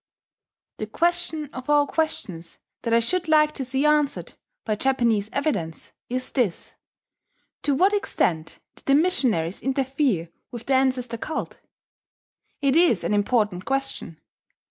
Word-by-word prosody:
The 215 - -3
question 330 +1 0
of 255 +2 -8
all 295 -1 +5
questions 190 - -3 0.2
that 230 - -3
I 230 - +5
should 345 +10 +1
like 305 -1 +4
to 280 - -5
see 265 +3 -1
answered, 300 -1 +1 0.3
by 215 - 0
Japanese 230 -4 +1
evidence, 280 - -3 0.2
is 255 +1 -3
this: 235 -10 -1 0.9
To 285 -2 +1
what 385 +8 +3
extent 165 - -1 0.2
did - - -9
the 275 - +5
missionaries 250 - +2
interfere 265 - 0 0.2
with 235 -1 -8
the 275 - +1
ancestor 255 -3 +1
cult? 310 +7 -5 1.0
It 275 0 +3
is 325 - +4
an 170 - 0
important 205 -3 +1
question. 270 - -3
265 Hz, 135 wpm, -24 LUFS, 215-300 Hz, 1.0 s, all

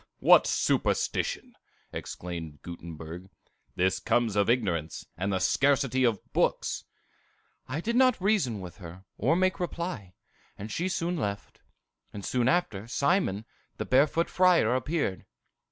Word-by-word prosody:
"What - - +6
superstition!" - - 0 0.4
exclaimed 85 -4 -7
Gutenberg; 85 +1 -8 0.5
"this 95 +1 +1
comes 120 -4 +1
of 100 +1 +2
ignorance, 90 -10 0
and 95 +4 -2
the 95 - +1
scarcity 135 +2 +2
of 115 -5 +2
books!" - - 0 0.8
"I 155 - -3
did 235 +5 -2
not 255 -3 +4
reason 185 - +1
with 90 -2 -9
her, 90 0 -11
or 140 +10 +3
make 185 +1 +1
reply, 170 - -4 0.4
and 105 +2 -7
she 180 +3 -1
soon 175 0 -1
left; 100 -7 -4 0.5
and 100 -1 -7
soon 125 -1 +1
after, 130 - 0
Simon, 140 - +1 0.3
the - - -3
Barefoot 145 +6 +3
Friar, 180 -11 +4
appeared. 130 - -2
120 Hz, 130 wpm, -28 LUFS, -, 0.8 s, What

